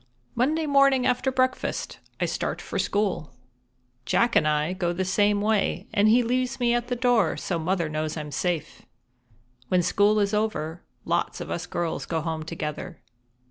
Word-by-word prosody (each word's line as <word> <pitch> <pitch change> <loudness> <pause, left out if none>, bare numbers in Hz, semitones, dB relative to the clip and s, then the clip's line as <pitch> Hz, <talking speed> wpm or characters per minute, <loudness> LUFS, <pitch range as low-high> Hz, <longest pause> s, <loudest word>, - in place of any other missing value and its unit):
_ - - -33 0.3
Monday 305 +7 +1
morning 275 -3 +4
after 255 +2 +1
breakfast 255 0 -1 0.2
I - - +1
start - - -2
for - - -4
school. 195 -10 -1 0.7
Jack 235 - +2
and 155 - +4
I 150 +3 +1
go 175 -2 -1
the 185 +2 -2
same 205 +2 +2
way, 210 -1 +1
and 205 +1 +4
he 240 +3 +5
leaves 255 +2 -1
me 240 -1 +2
at 240 0 0
the 245 - -1
door, 245 -2 +2
so 175 -3 -2
Mother 170 0 0
knows 155 +1 -3
I'm 150 -1 -5
safe. 165 +1 -2 0.9
When 180 -1 +2
school 205 +4 +3
is 200 0 +1
over, 180 -6 -1 0.2
lots - - -1
of - - -6
us 175 +1 -3
girls 170 -2 -3
go 165 -1 -1
home 160 0 -3
together. 160 +1 -5
200 Hz, 175 wpm, -25 LUFS, 165-240 Hz, 0.9 s, he